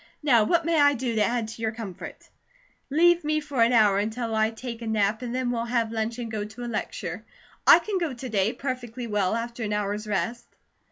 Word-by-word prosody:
Now 240 -7 +5
what 340 +6 +2
may 330 -2 +3
I 285 0 +5
do 245 -1 -2
to 215 -1 +2
add 235 -1 0
to 225 - -9
your 220 -1 0
comfort?" 220 -6 -8 0.6
"Leave 345 +4 +4
me 305 +1 +1
for 285 -5 -2
an 230 +1 +5
hour 210 -4 +4
until 225 +2 -2
I 220 0 +2
take 230 +1 -7
a 230 - -5
nap, 215 0 +1
and 245 -1 -4
then 255 -1 0
we'll 235 -1 -2
have 235 -2 0
lunch 225 +1 -2
and 235 -2 -5
go 215 -2 -2
to 215 +3 -8
a - - -4
lecture. 240 - -4 0.4
I - - +10
can 405 -3 -2
go 335 -4 -1
to 255 0 -7
day, 205 -1 +1
perfectly 250 -2 -5
well, 210 -2 0
after 235 +1 -4
an 210 -1 -2
hour's 210 +1 -2
rest." 210 +4 -2
230 Hz, 225 wpm, -26 LUFS, 220-255 Hz, 0.6 s, I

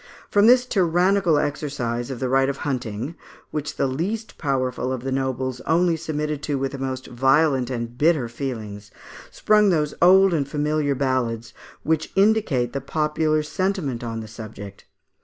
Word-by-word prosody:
From 205 +1 +5
this 250 +1 +6
tyrannical 180 -4 +2
exercise 140 -5 -2
of 130 -3 -5
the 130 - -1
right 135 +1 +2
of 140 - -3
hunting, 125 0 -3 0.4
which 150 -1 -4
the - - 0
least 185 - -3
powerful 130 -3 -1
of 130 -2 -4
the 135 - -3
nobles 130 -1 -2
only 170 +1 +3
submitted 150 -2 -3
to 145 -1 -2
with 135 0 -2
the 140 - -7
most 130 -1 -4
violent 135 +1 +2
and 120 -2 -4
bitter 150 -5 +3
feelings, 110 -5 -6 0.4
sprung 210 -1 +3
those 150 -4 +1
old 190 +1 +6
and 145 -4 0
familiar 150 0 0
ballads, 120 -4 -1 0.3
which 160 0 0
indicate 195 - +2
the 140 - -3
popular 155 +2 0
sentiment 160 - -2
on 115 -1 -4
the 110 - -8
subject. 105 -3 -10
140 Hz, 160 wpm, -23 LUFS, 125-160 Hz, 0.4 s, this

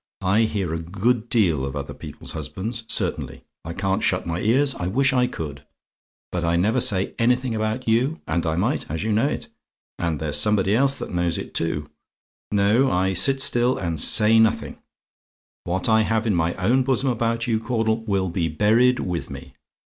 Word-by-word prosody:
I 100 +5 +3
hear 95 -6 -2
a 80 - -2
good 110 +7 -1
deal 90 - +2
of 70 +1 -4
other 70 -1 -5
people's - - -9
husbands, 115 +4 -5
certainly; - - -2 0.2
I 85 - -6
can't 95 +1 -1
shut - - 0
my 85 0 -3
ears; 135 +7 +2
I 90 - -4
wish 135 +7 +2
I 125 -1 +2
could: 75 - -7 0.7
but 90 -1 -2
I 85 0 +1
never 100 +6 +2
say 95 -2 0
anything 125 +1 +1
about 110 +3 -2
you, 125 +8 +1
and 80 +1 -1
I 80 - 0
might, 90 - -1
and 80 +2 -3
you 110 +1 -2
know 110 +6 +2
it - - -4 0.5
and 85 -4 -1
there's 75 -2 -2
somebody 100 +4 +3
else 135 +3 +3
that - - -7
knows 85 -1 0
it, - - -7
too. 75 -3 -1 0.6
No: 105 +6 +3
I 95 +1 +1
sit 135 +8 +2
still 120 +1 +2
and 85 -4 -3
say 110 +7 +6
nothing; 110 -1 +1 0.9
what 90 +2 -1
I 110 -1 +4
have 110 0 0
in 110 - +1
my 85 -1 0
own 115 +8 +2
bosom 130 0 0
about 115 -1 -1
you, 115 -2 0
Caudle, 110 -1 -1
will 95 -3 0
be 85 -1 -1
buried 110 +10 +3
with 90 -2 -3
me. 70 0 -10
105 Hz, 190 wpm, -23 LUFS, 85-115 Hz, 0.9 s, say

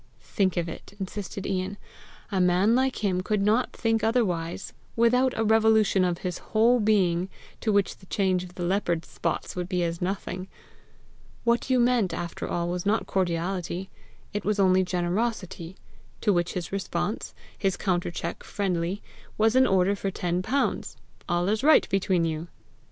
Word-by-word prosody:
"Think 190 -3 0
of 170 -1 0
it," 165 +4 -9
insisted 195 0 -5
Ian: 190 +1 -2 0.5
"a 190 -2 +1
man 180 +5 +4
like 260 +1 +1 0.2
could 210 0 0
not 220 +5 +2
think 225 -1 0
otherwise 190 -8 0 0.2
without 250 +3 +3
a 225 - +2
revolution 220 -3 +4
of 175 -1 +1
his 180 -1 -2
whole 235 +3 +3
being 190 -4 +2 0.3
to 220 - 0
which 200 -2 +1
the 185 - -18
change 185 -3 +1
of 180 0 -11
the 180 - -4
leopard's 175 -3 0
spots - - -3
would 180 0 -3
be 180 -2 +1
nothing. 185 0 -3 1.0
What 235 +2 +1
you 255 -1 +4
meant, 240 -5 +2
after 170 -1 -5
all, 170 0 -1
was 175 0 -2
not 210 +3 +1
cordiality; 180 0 -2 0.4
it 205 -1 -2
was 210 0 0
only 185 -1 +5
generosity; 180 -1 -2 0.5
to 210 - +3
which 175 -1 0
his 175 -1 -4
response, 195 0 -3 0.2
his 195 -2 0
countercheck 175 -2 -2
friendly, 185 -1 -2 0.3
was 220 +2 +3
an 260 0 +6
order 190 0 +3
for 195 0 -2
ten 180 -1 -1
pounds! 275 +9 -1 0.3
All 175 +1 +1
is 215 +4 0
right 310 +2 +6
between 190 -3 +2
you!" 160 +1 -3
190 Hz, 155 wpm, -26 LUFS, 175-215 Hz, 1.0 s, an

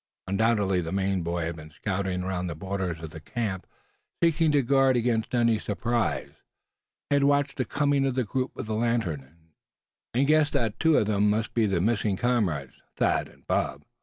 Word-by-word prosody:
Undoubtedly 100 -2 +2
the 80 -1 -5
Maine 95 -1 0
boy 85 0 -2
had 85 +1 -3
been 75 0 -10
scouting 90 +2 -2
around 90 -1 -2
the 85 - -4
borders 95 -1 -3
of 80 -1 -7
the 80 - -8
camp, 100 +2 -4 0.5
seeking 165 -1 +3
to 145 -2 +3
guard 135 0 +4
against 115 -1 0
any 115 -2 +3
surprise. 105 - -1 0.8
He 145 - +5
had 140 - +2
watched 145 -1 +2
the 130 - 0
coming 145 -1 +1
of 130 - -1
the 130 - +1
group 130 +4 -3
with - - -5
the 110 - -3
lantern, 85 - -2 0.6
and 135 +3 +3
guessed 150 0 +3
that 110 -3 -1
two 160 -1 +4
of - - +3
them 105 0 +2
must 110 +2 -1
be 115 -2 +2
the 95 -4 +1
missing 105 -1 +1
comrades, 95 - 0 0.2
Thad - - +1
and - - -21
Bob. - - -1
105 Hz, 190 wpm, -27 LUFS, 90-125 Hz, 0.8 s, He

